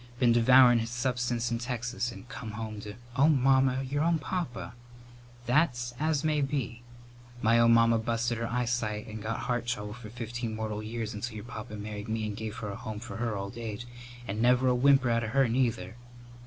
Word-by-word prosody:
Been 120 -1 +4
devourin' 120 +1 +7
his 115 0 -3
substance 120 -1 -1
in 115 - 0
Texas 120 0 -3
and 125 - -11
come 115 -4 -7
home 110 -1 -5
to 105 0 -8
" 120 0 -19
"Oh, 140 +4 +5
Mamma, 135 -2 +3
your 140 +2 -1
own 170 0 +3
papa!" 150 -7 -4 0.7
"That's 120 -2 +1
as 155 -1 +1
may 155 -1 +1
be. 135 -4 -2 0.6
My 115 +2 +5
own 115 0 +6
mamma 115 0 +4
busted 115 +1 -1
her 115 - -2
eyesight 115 -3 -1
and 110 -1 -7
got 110 +2 -3
heart 120 -1 -2
trouble 105 -4 -3
for 115 -2 -10
fifteen 115 0 -5
mortal 110 -1 -3
years 110 0 -4
until 110 +2 -5
your 105 0 -7
papa 110 -3 -7
married 105 0 -6
me 110 0 -1
and 105 -1 -4
gave 110 +1 -5
her 105 - -5
a 100 - -5
home 110 -1 -6
for 120 +1 -7
her 115 -3 -1
old 100 +4 -6
age, 115 0 -5 0.4
and 105 +3 -2
never 125 +2 +4
a - - +4
whimper 135 0 +4
out 115 0 +1
of 110 - -3
her, 135 -1 +4
neither. 115 -5 0
120 Hz, 205 wpm, -29 LUFS, 110-125 Hz, 0.7 s, devourin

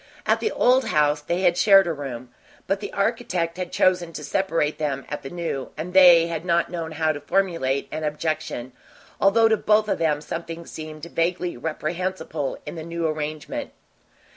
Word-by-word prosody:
At - - +3
the 440 - -1
"old" 255 +2 +3
house 150 0 +2
they 170 +4 -2
had 175 -2 +4
shared 195 +1 +6
a 170 - -1
room, 130 -4 -7 0.3
but 195 - 0
the 205 - -6
architect 200 -6 -1
had 180 -1 -4
chosen 180 -2 +2
to 150 - -7
separate 165 -1 0
them 140 -3 -2
at 150 - -4
the 135 - -7
New, 165 -6 -4
and 170 +4 -5
they 175 -3 +8
had 165 -1 -4
not 170 -1 +1
known 165 -2 -4
how 155 0 +1
to 145 -1 -6
formulate 155 -6 0
an 155 - -4
objection, 150 -4 -3 0.5
although 225 +3 +5
to 220 -1 +3
both 215 0 +3
of - - -1
them 155 -3 +1
something 165 +2 -6
seemed 155 -1 -8
vaguely 175 +1 -1
reprehensible 160 +1 -3
in - - -6
the 160 -2 -6
new 170 0 -3
arrangement. 155 - -4
165 Hz, 180 wpm, -24 LUFS, 150-185 Hz, 0.5 s, they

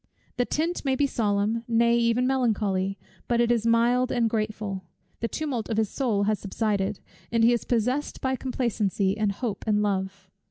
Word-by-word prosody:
The 245 - +2
tint 330 +6 -1
may 270 -2 +1
be 285 - +2
solemn, 215 -2 0
nay 235 0 +3
even 235 +1 +2
melancholy, 205 -7 0 0.3
but 240 -1 +1
it 240 0 +3
is 230 -1 +1
mild 240 +2 +3
and 235 -2 +2
grateful. 215 -3 -3 0.4
The 230 - -1
tumult 265 -6 -3
of 220 - -1
his 220 -2 +1
soul 225 -7 0
has 210 0 +1
subsided, 205 -1 -1 0.3
and 230 -1 +2
he 235 +1 +6
is 235 - -1
possessed 250 +5 0
by 260 0 0
complacency, 215 -7 -1
and 215 -2 +1
hope, 215 +1 -4
and 210 -1 +2
love. 190 -1 -3
230 Hz, 175 wpm, -26 LUFS, 205-245 Hz, 0.4 s, he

